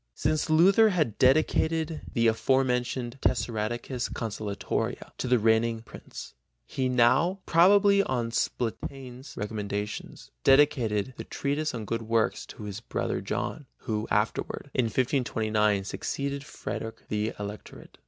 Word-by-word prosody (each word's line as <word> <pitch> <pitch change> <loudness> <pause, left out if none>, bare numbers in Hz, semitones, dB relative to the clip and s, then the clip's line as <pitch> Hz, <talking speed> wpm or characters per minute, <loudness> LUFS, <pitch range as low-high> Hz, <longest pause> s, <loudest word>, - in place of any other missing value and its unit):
Since 155 +1 0
Luther 190 +8 +6
had 155 - 0
dedicated 155 +3 +2
the 115 -1 +1
afore 130 +4 +3
mentioned 125 0 -2
Tessaradecas 120 +2 -1
consolatoria 105 -2 -3
to - - -2
the 125 0 +4
reigning 110 +1 +2
Prince, - - -10 0.3
he 130 -1 -2
now, 125 +9 +3
probably 200 +4 +5
on 120 -9 -1
Spalatin's 125 +3 -4
recommendation, 105 0 -4 0.3
dedicated 130 -5 +3
the - - -5
Treatise 145 +1 -2
on 110 -2 -5
Good 115 +3 -2
Works 115 0 0
to - - -10
his 105 0 -5
brother 115 - -3
John, 145 -4 -4
who 110 0 -3
afterward, 110 +6 -1
in 125 - +2
1525, 110 -5 +1
succeeded 140 +6 -3
Frederick 115 -5 -6
in - - -30
the 105 +1 -1
Electorate. 105 +1 -9
120 Hz, 125 wpm, -28 LUFS, 110-140 Hz, 0.3 s, Luther